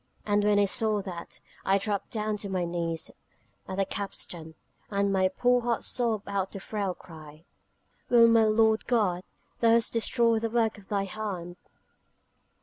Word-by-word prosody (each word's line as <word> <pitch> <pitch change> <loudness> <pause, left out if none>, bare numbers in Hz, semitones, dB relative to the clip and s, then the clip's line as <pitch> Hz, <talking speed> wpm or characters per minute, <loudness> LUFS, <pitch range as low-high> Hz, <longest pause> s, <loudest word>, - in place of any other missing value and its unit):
And 205 0 +2
when 205 0 +3
I 205 - +5
saw 215 +1 +2
that, 175 -3 -8 0.2
I 195 +1 +3
dropped 200 0 -3
down 215 -1 -2
upon 205 -1 -4
my 185 -2 0
knees 170 -1 -3 0.6
at 190 - -5
the 195 - +2
capstan, 175 -5 -5 0.3
and 200 -1 0
my 190 -1 +3
poor 245 +6 +2
heart 235 -1 -1
sobbed 230 -4 0
out 195 -1 -2
the 195 - -6
frail 195 -2 -3
cry: 155 -1 -13 0.6
'Well, 235 -1 +7
Lord 220 -1 +4
God, 205 -7 +1 0.4
Thou 230 - +4
hast 230 0 +3
destroyed 230 0 +2
the 230 - -1
work 225 -2 0
of 195 - -18
Thy 200 -1 0
hand...' 190 -4 -5
205 Hz, 160 wpm, -28 LUFS, 185-225 Hz, 0.6 s, Well